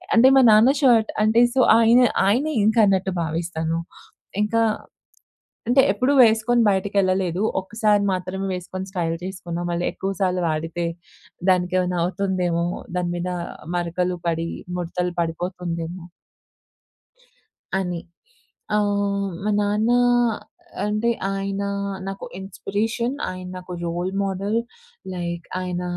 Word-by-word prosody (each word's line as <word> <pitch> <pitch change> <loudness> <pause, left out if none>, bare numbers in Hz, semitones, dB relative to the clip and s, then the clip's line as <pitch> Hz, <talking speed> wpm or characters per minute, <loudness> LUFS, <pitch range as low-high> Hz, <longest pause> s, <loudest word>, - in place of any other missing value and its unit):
అంటే 255 +3 +7
మా 265 - +7
నాన్న 225 +6 +6
షర్ట్ 230 -4 +4
అంటే 220 +2 +4
సో, - - +2 0.2
ఆయన, 230 +2 +6 0.3
ఆయనే 280 +9 +2
ఇంకా 220 +1 +4
అన్నట్టు 190 -1 +1
భావిస్తాను. 165 0 -2 0.6
ఇంకా 230 +2 +1 1.1
అంటే 260 +2 +5
ఎప్పుడు 255 +7 +1
వేసుకొని 230 +1 +4
బయటకెళ్ళలేదు. 190 -2 +1 0.2
ఒక్కసారి 210 +1 +1
మాత్రమే 185 +1 -3
వేసుకొని 185 +1 -6
స్టైల్ 170 -3 -1
చేసుకున్నాం. 175 -2 -5
మళ్ళీ 170 +1 -1
ఎక్కువ 195 - -3
సార్లు 185 -1 +1
వాడితే 165 +2 -2 0.6
దానికేమైనా 180 0 +1
అవుతుందేమో. 180 -3 0 0.3
దాని 175 -1 -1
మీన 180 +1 -3 0.5
మరకలు 180 +1 -1
పడి 165 0 -1 0.3
ముడతలు 180 +1 -2
పడిపోతుందేమో... 170 0 -4 1.7
అని. 180 -3 -2 0.8
ఆహ్, 200 -1 0
మా 210 - +1
నాన్న 210 +3 +1 0.9
అంటే, 215 +3 0 0.2
ఆయన 195 0 -3 0.5
నాకు 195 - -6
ఇన్‌స్పిరేషన్. 215 +6 -2 0.2
ఆయన 185 0 -7
నాకు 180 0 -8
రోల్ 175 +2 -2
మోడల్. 195 +3 -1 0.6
లైక్ 170 -1 -4 0.2
ఆయన 180 -1 -3
190 Hz, 110 wpm, -23 LUFS, 175-210 Hz, 1.7 s, అంటే